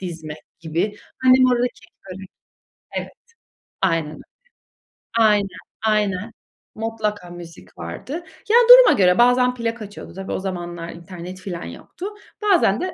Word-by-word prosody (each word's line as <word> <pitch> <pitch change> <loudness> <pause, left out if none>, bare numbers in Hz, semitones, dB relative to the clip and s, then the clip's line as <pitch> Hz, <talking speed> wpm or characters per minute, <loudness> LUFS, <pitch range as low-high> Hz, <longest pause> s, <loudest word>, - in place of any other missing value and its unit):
dizmek 160 -4 -7 0.2
gibi. 170 +6 -2 0.3
Annem 255 0 +6
o 250 - +3
arada 245 0 +2
kek, 220 - -21 0.3
börek 190 -1 -10 0.7
Evet. - - -4 0.7
Aynen 165 -5 +1
öyle. - - -11 1.0
Aynen, 210 -3 +4 0.4
aynen. 210 0 0 0.4
Mutlaka 215 -4 -3
müzik 170 - -12
vardı. 85 - -7 0.4
Ya, 455 - +4
duruma - - +10
göre 180 -1 +5
bazen 250 +1 +4
plak 230 -1 -3
açıyordu, 205 0 -9
-tabii, 195 +1 -7
o - - -2
zamanlar 175 -3 -5
internet 175 +2 -9
filan 180 -2 -6
yoktu 365 - -9 0.4
bazen 350 - +3
de 370 0 -3
195 Hz, 135 wpm, -21 LUFS, 175-230 Hz, 1.0 s, duruma